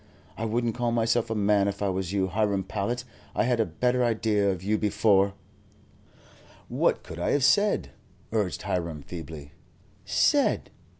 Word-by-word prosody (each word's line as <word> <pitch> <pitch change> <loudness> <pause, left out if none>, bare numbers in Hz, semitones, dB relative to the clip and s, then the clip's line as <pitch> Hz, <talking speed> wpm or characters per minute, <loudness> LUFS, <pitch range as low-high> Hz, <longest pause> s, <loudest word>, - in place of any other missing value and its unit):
I 115 - -3
wouldn't 115 +1 0
call 120 0 -1
myself 115 0 +1
a 115 - -1
man 100 -1 +3
if 100 0 -3
I 100 - +1
was 95 -1 -2
you, 100 -2 +1
Hiram 100 0 0
Powlett. 110 +6 -3 0.3
I - - +2
had 125 -1 +1
a 110 - +2
better 125 +9 +1
idea 110 -3 +1
of 95 -2 -3
you 105 +2 +1
before." 100 -2 +2 1.3
"What - - +1
could 80 - -9
I 85 - 0
have 145 - +2
said?" 205 +9 +3 0.4
urged 105 -5 -1
Hiram, 85 -4 -3
feebly. 80 -3 -8 0.5
"Said?" - - +2
105 Hz, 160 wpm, -27 LUFS, 95-115 Hz, 1.3 s, man